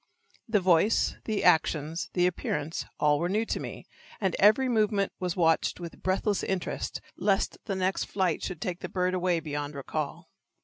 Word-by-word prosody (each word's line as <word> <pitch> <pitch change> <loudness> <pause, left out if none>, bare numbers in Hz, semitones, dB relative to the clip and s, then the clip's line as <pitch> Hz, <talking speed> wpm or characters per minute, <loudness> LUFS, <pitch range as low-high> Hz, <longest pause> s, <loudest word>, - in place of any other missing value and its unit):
The 220 -2 +3
voice, 185 +3 +3
the 215 -2 -1
actions, 160 -1 +2
the 180 -1 +3
appearance, 160 -3 -2
all 150 -1 +3
were 175 - 0
new 215 +4 +1
to - - -2
me, - - -7 0.3
and 190 -4 0
every 215 +6 +5
movement 215 -4 +2
was 180 -2 -2
watched 165 -2 +2
with 170 -1 -8
breathless 195 +2 0
interest 190 -2 -3 0.2
lest 195 -1 +1
the 195 - -2
next 190 0 0
flight 185 -5 0
should 175 -4 -5
take 180 +1 -3
the - - -6
bird 185 0 0
away 180 -2 +1
beyond 145 -1 -4
recall. 140 +1 -4
180 Hz, 170 wpm, -28 LUFS, 165-195 Hz, 0.3 s, every